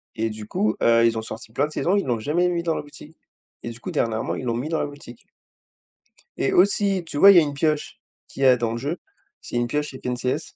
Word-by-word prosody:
et 115 Hz, 0 st, -1 dB
du 110 Hz, -1 st, -8 dB
coup, 110 Hz, 0 st, 0 dB
heu, 115 Hz, 0 st, +5 dB
ils 115 Hz, -1 st, +2 dB
ont -, -, -2 dB
sorti 110 Hz, 0 st, -9 dB
plein 140 Hz, +5 st, +1 dB
de -, -, -14 dB
saisons, 175 Hz, +5 st, 0 dB
ils 200 Hz, -, +1 dB
l'ont 120 Hz, -3 st, -1 dB
jamais 160 Hz, +10 st, +1 dB
mis 170 Hz, -1 st, -1 dB
dans 165 Hz, -2 st, 0 dB
la -, -, -3 dB
boutique 150 Hz, +2 st, -14 dB, 0.5 s
et -, -, -3 dB
du 115 Hz, 0 st, -9 dB
coup, -, -, -6 dB
dernièrement, 110 Hz, -1 st, -1 dB
ils -, -, -6 dB
l'ont 115 Hz, -2 st, -1 dB
mis 125 Hz, +5 st, -3 dB
dans 160 Hz, 0 st, -1 dB
la -, -, 0 dB
boutique. 145 Hz, -4 st, -12 dB, 1.1 s
Et -, -, 0 dB
aussi 195 Hz, 0 st, +3 dB
tu 155 Hz, -, -6 dB
vois, 200 Hz, +6 st, +9 dB
il 185 Hz, -, +6 dB
y -, -, +11 dB
a 165 Hz, -, +4 dB
une 145 Hz, -, -3 dB
pioche 150 Hz, +1 st, -1 dB, 0.3 s
qu'il 135 Hz, -, -5 dB
y -, -, +5 dB
a 130 Hz, -1 st, +6 dB
dans 115 Hz, -1 st, -1 dB
le 115 Hz, -, -3 dB
jeu, 145 Hz, +8 st, -3 dB, 0.4 s
c'est -, -, -8 dB
une 120 Hz, 0 st, +1 dB
pioche 150 Hz, +1 st, -3 dB
FNCS. 125 Hz, 0 st, -3 dB
135 Hz, 260 wpm, -23 LUFS, 115-160 Hz, 1.1 s, y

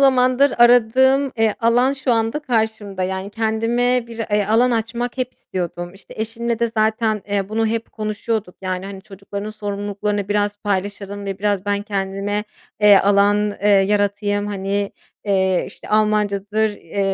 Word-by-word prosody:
zamandır 260 Hz, 0 st, +4 dB
aradığım, 255 Hz, +3 st, +5 dB
eee, 225 Hz, -1 st, +2 dB
alan 245 Hz, +4 st, +3 dB
şu 265 Hz, -3 st, -1 dB
anda 225 Hz, +4 st, +1 dB
karşımda. 220 Hz, -7 st, -1 dB
Yani, 190 Hz, +2 st, -3 dB
kendime 230 Hz, +3 st, 0 dB
bir 230 Hz, -1 st, -10 dB
e 205 Hz, -1 st, +2 dB
alan 235 Hz, +4 st, +3 dB
açmak 235 Hz, +2 st, -2 dB
hep 255 Hz, 0 st, -2 dB
istiyordum. 175 Hz, 0 st, -5 dB
İşte, 195 Hz, -, -14 dB
eşimle 230 Hz, +1 st, -2 dB
de 235 Hz, -, +2 dB
zaten, 220 Hz, -1 st, +1 dB
eee, 200 Hz, -1 st, -1 dB
bunu 225 Hz, +1 st, 0 dB
hep 230 Hz, +1 st, -3 dB
konuşuyorduk. 215 Hz, -2 st, -3 dB
Yani, 185 Hz, 0 st, -3 dB
hani, 195 Hz, -1 st, -8 dB
çocukların 200 Hz, 0 st, -7 dB
sorumluluklarını 205 Hz, -1 st, -3 dB
biraz 205 Hz, 0 st, 0 dB
paylaşalım 200 Hz, 0 st, -3 dB
ve 195 Hz, -1 st, -4 dB
biraz 205 Hz, -2 st, 0 dB
ben 205 Hz, 0 st, 0 dB
kendime, 200 Hz, 0 st, -2 dB, 0.4 s
eee, 205 Hz, -1 st, +8 dB
alan, 205 Hz, +1 st, +3 dB
eee, 210 Hz, -, +3 dB
yaratayım. 205 Hz, +1 st, +2 dB
Hani, 200 Hz, 0 st, -2 dB, 0.3 s
eee, 190 Hz, -2 st, +2 dB
işte, -, -, -12 dB
Almancadır, 210 Hz, 0 st, +1 dB
eee, 200 Hz, -1 st, -6 dB
210 Hz, 145 wpm, -20 LUFS, 200-225 Hz, 0.4 s, eee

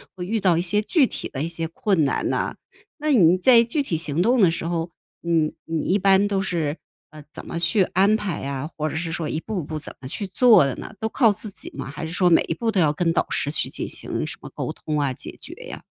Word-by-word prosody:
会 180 Hz, -2 st, -5 dB
遇 220 Hz, +4 st, -1 dB
到 185 Hz, -4 st, +3 dB
一 170 Hz, -, 0 dB
些 205 Hz, +4 st, +1 dB
具 280 Hz, -, +3 dB
体 -, -, -5 dB
的 140 Hz, +1 st, -4 dB
一 -, -, -1 dB
些 165 Hz, -1 st, -4 dB
困 195 Hz, -2 st, 0 dB
难 140 Hz, -, 0 dB
啊， -, -, -2 dB, 0.4 s
那 305 Hz, 0 st, -1 dB
你 180 Hz, -7 st, +5 dB
在 235 Hz, +4 st, +6 dB
具 260 Hz, +6 st, -1 dB
体 165 Hz, -, -2 dB
行 155 Hz, +2 st, -1 dB
动 240 Hz, +1 st, +3 dB
的 180 Hz, -, +6 dB
时 165 Hz, -, -4 dB
候， 165 Hz, 0 st, -2 dB, 0.3 s
你 165 Hz, -2 st, +1 dB
你 160 Hz, -2 st, -2 dB
一 200 Hz, +3 st, +1 dB
般 195 Hz, +1 st, +4 dB
都 195 Hz, -1 st, 0 dB
是， 165 Hz, -5 st, -2 dB, 0.3 s
呃， 155 Hz, -1 st, -12 dB
怎 -, -, -9 dB
么 170 Hz, -, -4 dB
去 175 Hz, +4 st, +3 dB
安 195 Hz, +4 st, +3 dB
排 195 Hz, -7 st, -3 dB
呀？ 140 Hz, +1 st, -4 dB
或 155 Hz, 0 st, -2 dB
者 -, -, -6 dB
是 165 Hz, 0 st, -3 dB
说 160 Hz, -2 st, -3 dB
一 155 Hz, -, -2 dB
步 190 Hz, -1 st, -4 dB
步 155 Hz, +2 st, -5 dB
怎 150 Hz, -, -7 dB
么 130 Hz, -, -7 dB
去 200 Hz, +9 st, -4 dB
做 215 Hz, -, +5 dB
的 135 Hz, -, -1 dB
呢？ -, -, -9 dB
都 220 Hz, -, -1 dB
靠 225 Hz, -1 st, +3 dB
自 205 Hz, +1 st, -5 dB
己 -, -, -4 dB
吗？ -, -, -4 dB
还 145 Hz, +3 st, -6 dB
是 160 Hz, -, -7 dB
说 180 Hz, -1 st, +2 dB
每 -, -, +6 dB
一 165 Hz, -, -1 dB
步 225 Hz, +5 st, -1 dB
都 195 Hz, -4 st, +2 dB
要 150 Hz, -2 st, +4 dB
跟 165 Hz, +2 st, 0 dB
导 -, -, +1 dB
师 145 Hz, -, -1 dB
去 -, -, -1 dB
进 -, -, -4 dB
行 -, -, -2 dB
什 -, -, -6 dB
么 -, -, -9 dB
沟 -, -, -3 dB
通 150 Hz, -1 st, -3 dB
啊， 140 Hz, -2 st, 0 dB
解 -, -, -7 dB
决 -, -, -8 dB
呀。 -, -, -8 dB
175 Hz, 285 characters per minute, -23 LUFS, 155-205 Hz, 0.4 s, 在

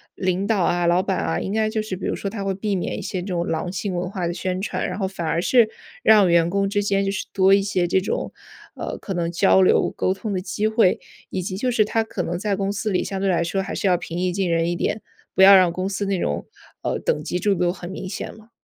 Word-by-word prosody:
领 185 Hz, +1 st, -1 dB
导 215 Hz, -4 st, +2 dB
啊， 175 Hz, 0 st, +1 dB
老 175 Hz, +2 st, +4 dB
板 190 Hz, -2 st, -1 dB
啊， 165 Hz, -, -1 dB
应 195 Hz, -, -3 dB
该 215 Hz, 0 st, +1 dB
就 220 Hz, -1 st, -1 dB
是 215 Hz, -3 st, -4 dB
比 185 Hz, -, -6 dB
如 -, -, -1 dB
说 200 Hz, -, -4 dB
他 200 Hz, -2 st, -5 dB
会 195 Hz, -1 st, -1 dB
避 205 Hz, 0 st, -2 dB
免 180 Hz, -, -2 dB
一 -, -, -5 dB
些 185 Hz, -, -4 dB
这 185 Hz, -, -7 dB
种 175 Hz, -2 st, -1 dB
狼 165 Hz, +2 st, -2 dB
性 190 Hz, 0 st, -3 dB
文 180 Hz, +1 st, -2 dB
化 185 Hz, -3 st, -3 dB
的 170 Hz, -, -2 dB
宣 185 Hz, +1 st, -3 dB
传， 200 Hz, -, -2 dB
然 180 Hz, -, -4 dB
后 190 Hz, -, 0 dB
反 185 Hz, -3 st, -5 dB
而 170 Hz, -, 0 dB
是 235 Hz, +1 st, +4 dB, 0.3 s
让 210 Hz, -4 st, +6 dB
员 170 Hz, 0 st, +4 dB
工 195 Hz, +1 st, +1 dB
之 205 Hz, 0 st, 0 dB
间 195 Hz, -1 st, +1 dB
就 195 Hz, -, 0 dB
是 195 Hz, -, -3 dB
多 190 Hz, 0 st, +5 dB
一 200 Hz, -, +5 dB
些 190 Hz, -3 st, 0 dB
这 190 Hz, -, +2 dB
种， -, -, -3 dB, 0.4 s
呃， -, -, -5 dB
可 195 Hz, -, -5 dB
能 170 Hz, -1 st, -1 dB
交 190 Hz, +2 st, +4 dB
流 185 Hz, -, +3 dB
沟 -, -, +1 dB
通 200 Hz, +1 st, -5 dB
的 185 Hz, -, -1 dB
机 190 Hz, +4 st, -1 dB
会， 220 Hz, -4 st, +3 dB, 0.3 s
以 185 Hz, -, -3 dB
及 185 Hz, 0 st, -4 dB
就 250 Hz, +4 st, 0 dB
是 220 Hz, -3 st, +3 dB
他 225 Hz, +1 st, 0 dB
可 205 Hz, -5 st, -4 dB
能 175 Hz, +1 st, -3 dB
在 205 Hz, 0 st, 0 dB
公 195 Hz, 0 st, -1 dB
司 210 Hz, +2 st, -2 dB
里 185 Hz, -, +1 dB
相 195 Hz, -1 st, -4 dB
对 195 Hz, 0 st, +1 dB
来 170 Hz, -2 st, +2 dB
说 190 Hz, +3 st, -1 dB
还 190 Hz, -, -5 dB
是 -, -, -3 dB
要 180 Hz, -, +4 dB
平 170 Hz, 0 st, -6 dB
易 180 Hz, 0 st, 0 dB
近 190 Hz, -2 st, 0 dB
人 165 Hz, 0 st, +1 dB
一 -, -, -1 dB
点， 210 Hz, +4 st, -2 dB, 0.3 s
不 -, -, +3 dB
要 195 Hz, 0 st, +10 dB
让 180 Hz, -2 st, +5 dB
公 185 Hz, +2 st, -3 dB
司 200 Hz, +1 st, -2 dB
那 195 Hz, -2 st, 0 dB
种， 75 Hz, -, -2 dB, 0.3 s
呃， -, -, -1 dB
等 150 Hz, -, 0 dB
级 180 Hz, -, -2 dB
制 205 Hz, +2 st, +1 dB
度 175 Hz, 0 st, +1 dB
很 175 Hz, -1 st, -8 dB
明 190 Hz, -, -6 dB
显 195 Hz, -, -5 dB
了。 220 Hz, +1 st, -17 dB
190 Hz, 305 characters per minute, -22 LUFS, 180-200 Hz, 0.4 s, 要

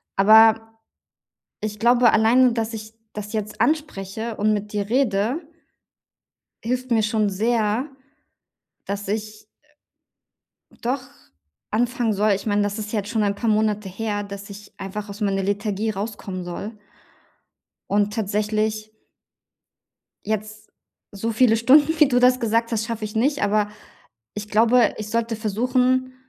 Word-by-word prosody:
aber 220 Hz, +2 st, +5 dB, 0.8 s
ich 210 Hz, -1 st, -4 dB
glaube 240 Hz, +1 st, +5 dB
alleine, 240 Hz, +4 st, +4 dB
dass 230 Hz, -1 st, -2 dB
ich 215 Hz, 0 st, -8 dB, 0.2 s
das 210 Hz, 0 st, -6 dB
jetzt 215 Hz, -1 st, -4 dB
anspreche 225 Hz, -8 st, -2 dB
und 215 Hz, +1 st, +1 dB
mit 210 Hz, 0 st, -3 dB
dir 205 Hz, -1 st, -2 dB
rede 240 Hz, -, +1 dB, 1.2 s
hilft 255 Hz, +2 st, -2 dB
mir 225 Hz, -2 st, +3 dB
schon 215 Hz, -1 st, +1 dB
sehr, 220 Hz, +4 st, 0 dB, 1.0 s
dass 200 Hz, 0 st, -4 dB
ich 215 Hz, 0 st, -4 dB, 1.4 s
doch 255 Hz, +3 st, -1 dB, 0.7 s
anfangen 240 Hz, 0 st, 0 dB
soll. 210 Hz, +1 st, +2 dB
Ich 200 Hz, +2 st, -1 dB
meine, 205 Hz, -1 st, +1 dB
das 205 Hz, +1 st, -1 dB
ist 210 Hz, 0 st, -5 dB
ja 220 Hz, -, 0 dB
jetzt 205 Hz, +1 st, -6 dB
schon 220 Hz, -2 st, 0 dB
ein 200 Hz, 0 st, 0 dB
paar 230 Hz, 0 st, -1 dB
Monate 210 Hz, -2 st, +1 dB
her, 205 Hz, +1 st, -3 dB
dass 200 Hz, 0 st, -9 dB
ich 205 Hz, +1 st, -12 dB
einfach 205 Hz, +2 st, -6 dB
aus 205 Hz, +2 st, -9 dB
meiner 195 Hz, -1 st, 0 dB
Lethargie 205 Hz, +2 st, -1 dB
rauskommen 200 Hz, -3 st, -5 dB
soll. 200 Hz, +5 st, -7 dB, 1.1 s
Und 205 Hz, 0 st, +1 dB
tatsächlich 215 Hz, 0 st, -1 dB, 1.3 s
jetzt 215 Hz, 0 st, -4 dB, 0.4 s
so 225 Hz, +3 st, -3 dB
viele 225 Hz, 0 st, +4 dB
Stunden, 290 Hz, +7 st, +4 dB
wie 300 Hz, -, +7 dB
du 245 Hz, -2 st, +2 dB
das 250 Hz, 0 st, +4 dB
gesagt 230 Hz, 0 st, 0 dB
hast, 225 Hz, 0 st, -1 dB
schaffe 230 Hz, -2 st, -4 dB
ich 210 Hz, -, -8 dB
nicht. 280 Hz, +6 st, +1 dB
Aber 210 Hz, 0 st, +1 dB, 0.6 s
ich 210 Hz, 0 st, -7 dB
glaube, 230 Hz, +1 st, +4 dB
ich 215 Hz, -1 st, -6 dB
sollte 230 Hz, 0 st, -1 dB
versuchen, 250 Hz, +4 st, 0 dB
215 Hz, 140 wpm, -22 LUFS, 205-230 Hz, 1.4 s, wie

